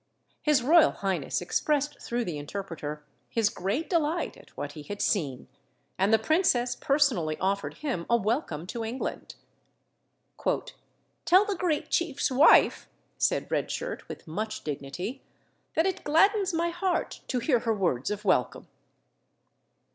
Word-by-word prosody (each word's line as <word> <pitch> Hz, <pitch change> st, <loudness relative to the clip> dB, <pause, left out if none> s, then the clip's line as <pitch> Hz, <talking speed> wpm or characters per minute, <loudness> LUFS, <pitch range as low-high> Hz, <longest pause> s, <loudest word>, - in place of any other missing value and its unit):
His 295 Hz, -5 st, +3 dB
royal 320 Hz, +4 st, +6 dB
highness 185 Hz, -8 st, -2 dB
expressed 295 Hz, +10 st, 0 dB
through 240 Hz, 0 st, -2 dB
the 160 Hz, -6 st, -4 dB
interpreter 150 Hz, -3 st, -6 dB, 0.2 s
his 225 Hz, -2 st, +2 dB
great 215 Hz, -, -2 dB
delight 330 Hz, -1 st, 0 dB
at -, -, -17 dB
what 145 Hz, -, -4 dB
he 150 Hz, -, -9 dB
had 205 Hz, +7 st, -7 dB
seen, 140 Hz, -, -1 dB, 0.5 s
and 195 Hz, +3 st, +2 dB
the 225 Hz, -, +7 dB
princess 245 Hz, -, +2 dB
personally 250 Hz, -, +1 dB
offered 195 Hz, +1 st, -1 dB
him 210 Hz, -, -2 dB
a 235 Hz, -, +5 dB
welcome 215 Hz, -, -1 dB
to 230 Hz, +5 st, -5 dB
England. 235 Hz, +4 st, -5 dB, 1.9 s
"Tell 375 Hz, +4 st, +5 dB
the 410 Hz, -2 st, -1 dB
great 335 Hz, -4 st, -1 dB
chief's 295 Hz, -5 st, 0 dB
wife," 280 Hz, +5 st, +5 dB, 0.3 s
said -, -, +1 dB
Red -, -, 0 dB
Shirt -, -, -5 dB
with -, -, -9 dB
much 215 Hz, +7 st, -4 dB
dignity, 155 Hz, -, -5 dB, 0.5 s
"that 320 Hz, -, +3 dB
it 380 Hz, -2 st, -1 dB
gladdens 390 Hz, +6 st, +3 dB
my 340 Hz, 0 st, 0 dB
heart 350 Hz, +1 st, -2 dB
to 255 Hz, -, -1 dB
hear 245 Hz, 0 st, +2 dB
her 225 Hz, -1 st, 0 dB
words 170 Hz, -11 st, 0 dB
of 210 Hz, 0 st, -4 dB
welcome." 180 Hz, -10 st, +1 dB
235 Hz, 140 wpm, -28 LUFS, -, 1.9 s, the